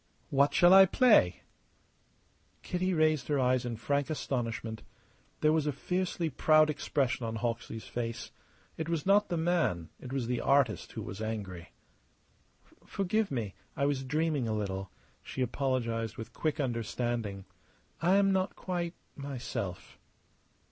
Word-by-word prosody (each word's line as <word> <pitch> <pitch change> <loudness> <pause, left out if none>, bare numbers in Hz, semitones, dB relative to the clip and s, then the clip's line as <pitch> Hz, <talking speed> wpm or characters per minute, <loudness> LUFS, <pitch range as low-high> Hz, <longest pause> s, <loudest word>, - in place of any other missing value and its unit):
"What 140 +1 +4
shall 175 +5 +6
I 195 0 +9
play?" 135 - +4 1.2
Kitty 185 +1 -1
raised 155 -4 +2
her 145 -2 +1
eyes 125 -1 +2
in 120 -1 -3
frank 140 +6 -1
astonishment. 115 -6 -3 0.6
There 155 0 +4
was 155 -2 +1
a - - +2
fiercely 180 +3 -2
proud 155 +1 +4
expression 130 -4 -1
on 115 0 -3
Hawksley's 115 -1 -3
face. 115 -1 -4 0.5
It 160 0 -3
was 165 -3 -1
not 205 +2 +4
the 175 - -1
man, 160 - 0
it 125 - -9
was 135 -3 -1
the 120 0 -1
artist 135 -5 +2
who - - -5
was 95 +3 -7
angry. 100 -6 -5 1.1
"Forgive 200 +2 0
me! 115 -7 -3 0.2
I 140 - +2
was 140 -2 0
dreaming 150 -2 0
a 110 - -1
little," 95 -2 -3 0.3
she 130 - -3
apologized 120 -4 -1
with 115 +1 -8
quick 155 0 -1
understanding. 115 -5 -2 0.6
"I 180 +3 +4
am 200 0 +4
not 190 0 0
quite 175 -2 -3 0.2
myself." 125 -9 -5
135 Hz, 140 wpm, -31 LUFS, 115-160 Hz, 1.2 s, I